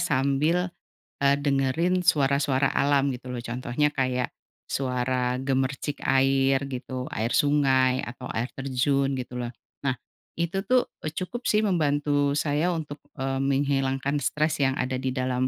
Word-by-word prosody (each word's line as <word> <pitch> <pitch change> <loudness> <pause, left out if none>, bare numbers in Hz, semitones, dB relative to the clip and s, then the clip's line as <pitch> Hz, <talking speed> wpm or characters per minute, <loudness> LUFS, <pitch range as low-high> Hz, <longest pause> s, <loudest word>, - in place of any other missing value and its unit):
sambil, 160 +4 +1 0.5
eee, 140 0 +5
dengerin 145 +6 +1
suara-suara 140 -3 +3
alam 140 -1 +3
gitu 125 0 -9
loh. 125 - -4
Contohnya 125 +4 0
kayak 130 -3 -1 0.3
suara 125 -1 0
gemercik 135 +2 -1
air 135 0 +3
gitu, 130 -1 -5
air 110 +2 -1
sungai 130 -3 +3
atau 125 +1 -7
air 120 +3 -1
terjun 135 +1 0
gitu 125 -1 -5
loh. 120 -1 -3 0.3
Nah, 130 -2 +1 0.4
itu 170 +3 -1
tuh, 255 -1 +2 0.2
eee, - - -3
cukup 235 +8 -4
sih 215 0 +3
membantu 145 -6 +1
saya 150 +4 +1
untuk, 150 -2 -5 0.2
eee, 135 -1 -2
menghilangkan 135 0 +1
stres 150 +3 0
yang 135 -1 +2
ada 130 -1 -1
di 130 -1 -2
dalam, 130 0 0
135 Hz, 140 wpm, -26 LUFS, 130-145 Hz, 0.5 s, eee